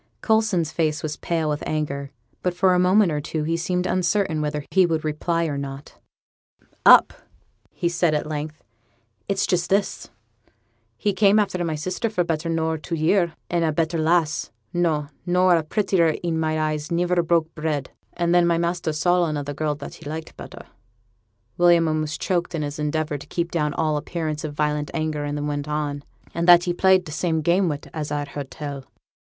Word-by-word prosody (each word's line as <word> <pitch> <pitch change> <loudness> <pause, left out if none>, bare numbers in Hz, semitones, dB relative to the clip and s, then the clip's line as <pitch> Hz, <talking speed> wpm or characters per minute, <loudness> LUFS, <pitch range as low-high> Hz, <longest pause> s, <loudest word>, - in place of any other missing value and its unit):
Coulson's 220 -8 +2
face 155 -2 -1
was 150 -1 -3
pale 165 -2 -1
with 150 0 -1
anger, 140 -2 -2 0.3
but 180 -1 -1
for 185 +1 +3
a 180 - +3
moment 185 +1 +4
or 150 -1 -1
two 155 +1 -3
he 165 +2 0
seemed 180 +2 -1
uncertain 185 -3 +1
whether 150 -1 -3
he 190 - +5
would 160 -3 0
reply 165 +2 0
or 145 -3 -2
not. 140 0 -8 0.8
'Up!' - - +7 0.7
said 170 -1 +1
he - - +4
at - - -4
length. 155 0 -5 0.7
'It's 195 -1 +1
just 175 -1 0
this: 195 0 0 0.9
he 205 -2 0
came 200 +1 +4
after 195 -4 +1
my 160 -2 -1
sister 185 +8 -2
for 180 -5 0
better 165 -1 -2
nor 160 -1 0
two 165 +3 -4
year; 170 +2 +2
and 170 -1 0
a 160 - +2
better 165 +2 0
lass 160 -1 +1 0.2
no, 160 -4 +1 0.2
nor 180 0 +4
a 165 - +2
prettier 170 -1 +1
i' 170 - 0
my 160 -1 0
eyes 155 0 -2
niver 175 +1 +2
broke 165 -1 +1
bread. 150 -3 -3 0.2
And 170 0 0
then 175 -1 +4
my 170 -1 +2
master 170 -1 -1
saw 175 +3 +2
another 145 -2 -3
girl, 150 +1 -1
that 145 0 -9
he 145 - -9
liked 160 +1 -6
better' - - -10 0.9
William 170 -1 +5
almost 155 0 -2
choked 175 -2 -1
in 155 - -2
his 145 +1 -5
endeavour 150 0 -1
to - - -12
keep 170 -1 -2
down 150 -3 -1
all 155 -1 +1
appearance 155 0 -3
of 150 -2 -5
violent 150 0 -1
anger, 155 -2 -2
and 145 0 -3
then 145 - -3
went 145 0 -3
on, 150 -1 -2 0.3
'and 170 +1 -1
that 175 -1 +8
he 175 - -1
played 185 0 +4
t' 155 - -8
same 160 0 0
game 175 +3 +3
wi', 145 -2 -3
as 150 -2 -4
I've 145 -1 -2
heerd 140 -1 -6
tell.' 140 -3 -7
160 Hz, 195 wpm, -23 LUFS, 150-175 Hz, 0.9 s, that